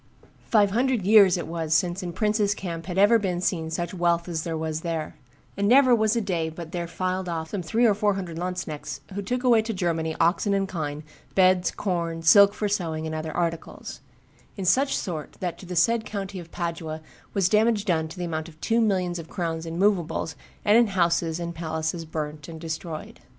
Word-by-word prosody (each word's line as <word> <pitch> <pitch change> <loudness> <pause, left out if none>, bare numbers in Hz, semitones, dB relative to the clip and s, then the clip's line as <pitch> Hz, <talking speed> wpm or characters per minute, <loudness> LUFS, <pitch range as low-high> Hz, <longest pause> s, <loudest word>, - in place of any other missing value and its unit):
"Five 205 -3 +4
hundred 245 0 +1
years 200 -2 +6
it 175 - -4
was 160 -1 -1
since 175 +3 +1
in 180 -1 -4
prince's 210 +1 +1
camp 170 -3 -6
had 180 -1 -4
ever 205 +4 +6
been 185 -4 -1
seen 165 -3 -1
such 175 +3 -3
wealth 170 -1 +1
as 165 -2 -2
there 165 0 -3
was 160 0 -3
there; 165 -2 -3 0.4
and 200 0 0
never 255 +2 +6
was 220 -1 +3
a 235 - +1
day 175 -5 -1
but 160 0 -9
there 175 -1 -3
filed 185 +2 -2
off 160 -1 -4
some 200 - -2
three 220 +9 +1
or 215 - +5
four 205 0 +1
hundred 175 -4 -5
lanzknechts 180 -4 -4
who 200 - -3
took 250 +6 -2
away 235 -3 +5
to 220 -1 -4
Germany 165 -3 -1
oxen 190 +4 +2
and 195 0 0
kine, 150 -4 -4 0.3
beds, 185 -2 +4
corn, 170 -4 -3
silk 200 +4 +7
for 210 - -1
sewing, 165 -6 -2
and 160 - -4
other 155 0 -4
articles; 165 -1 -4 0.6
in 195 - -3
such 270 +10 +3
sort 160 -5 -5
that 180 -2 -3
to 185 - -11
the 180 - -5
said 230 +6 +3
country 200 -3 -5
of 170 -1 -11
Padua 165 -2 -4 0.4
was 195 -3 +3
damage 215 0 +2
done 160 -5 +1
to 160 - -11
the 180 - -3
amount 160 -1 -4
of 155 -1 -18
two 230 +6 +1
millions 185 -5 0
of 165 - -9
crowns 165 -3 -3
in 165 +1 -5
movables 185 -5 +1 0.3
and 210 +3 +6
in 240 - +4
houses 170 -3 +1
and 170 0 -4
palaces 160 0 -3
burnt 150 -2 -5
and 165 -1 -8
destroyed." 160 -1 -6
175 Hz, 210 wpm, -25 LUFS, 165-200 Hz, 0.6 s, silk